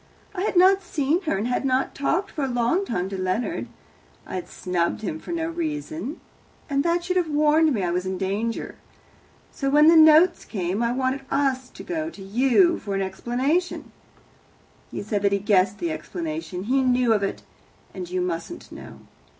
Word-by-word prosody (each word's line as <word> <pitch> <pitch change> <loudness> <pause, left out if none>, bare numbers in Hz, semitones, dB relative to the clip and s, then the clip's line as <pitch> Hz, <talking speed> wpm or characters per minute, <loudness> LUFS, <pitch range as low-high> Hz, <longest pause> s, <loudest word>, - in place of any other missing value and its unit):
I 365 - -4
had 405 - -1
not 380 +2 +6
seen 320 -1 0
her, 195 - +1
and 205 - -2
had 255 +1 0
talked 345 +8 -1
for 295 - -3
a - - 0
long 245 +10 +1
time 180 - -2
to 190 -1 -4
Leonard 185 - -2 0.6
I - - -9
had 180 -2 -4
snubbed 175 0 -2
him 160 -6 -3
for - - -8
no 330 -1 -1
reason, 315 -2 -4 0.5
and 280 -1 0
that 340 +1 +1
should 365 +1 -1
have 345 -3 +1
warned 305 +1 +3
me 215 -8 -1
I 175 - 0
was 180 +1 -1
in 190 0 -2
danger. 205 +5 -3 0.7
So 275 - -2
when 300 +3 +6
the 335 - +6
notes 315 +2 +6
came 190 0 -3
I 235 0 +1
wanted 260 +2 -1
us 265 -2 0
to - - -11
go 320 -2 -3
to 205 -12 -11
you 260 - +3
for 200 -2 -4
an 195 - 0
explanation. 255 - -1 1.0
He - - -5
said 205 -1 -2
that 200 0 +2
he - - +3
guessed 200 -1 +2
the 340 +5 -2
explanation 315 - -5
he 260 +6 +2
knew 250 -2 +3
of 210 - +1
it, 195 - -3 0.5
and 180 -3 -6
you 180 0 -1
mustn't 180 - -5
know. - - -11
260 Hz, 190 wpm, -24 LUFS, 195-320 Hz, 1.0 s, not